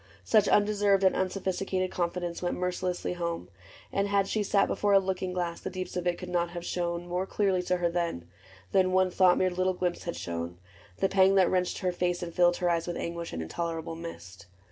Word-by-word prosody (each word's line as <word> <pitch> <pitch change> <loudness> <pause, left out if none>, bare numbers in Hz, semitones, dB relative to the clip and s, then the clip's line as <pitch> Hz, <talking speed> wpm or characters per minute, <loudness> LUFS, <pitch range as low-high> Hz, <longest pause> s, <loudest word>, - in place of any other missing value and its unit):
Such 215 -3 +4
undeserved 205 -1 +3
And 190 - +4
unsophisticated 190 0 -1
confidence 175 0 -2
Went 175 - -1
mercilessly 180 0 -2
home; 170 - -4 0.4
and 200 +1 +1
had 200 -1 +2
she 215 - 0
sat 200 0 +3
Before 205 -1 +1
a 195 - +8
looking 185 -1 -2
glass, 175 -2 -3
the - - -4
deeps 185 0 -5
of 180 0 -2
it 175 - +1
Could 180 - -7
not 175 -1 0
have 175 0 -7
shown 170 -1 -2
more 180 +2 -2
clearly 195 -3 +1
to 180 0 0
her 175 -1 +1
then 170 - -2 0.4
Than 185 -1 +3
one 185 0 +3
thought 180 0 +5
mirrored 185 -1 0
little 185 0 +2
glimpse 180 -1 -2
had 170 - -3
shown, 85 0 -5 0.4
The - - +2
pang 190 0 +4
that 190 -2 +4
wrenched 180 -1 0
her 185 -2 +1
face 175 0 -1
and 170 -1 -6
filled 175 0 +4
her 180 -1 +1
eyes 170 0 0
With 175 - -3
anguish 170 0 -4
and 80 - -4
intolerable 165 - -4
mist. 100 - -9
180 Hz, 210 wpm, -29 LUFS, 170-190 Hz, 0.4 s, a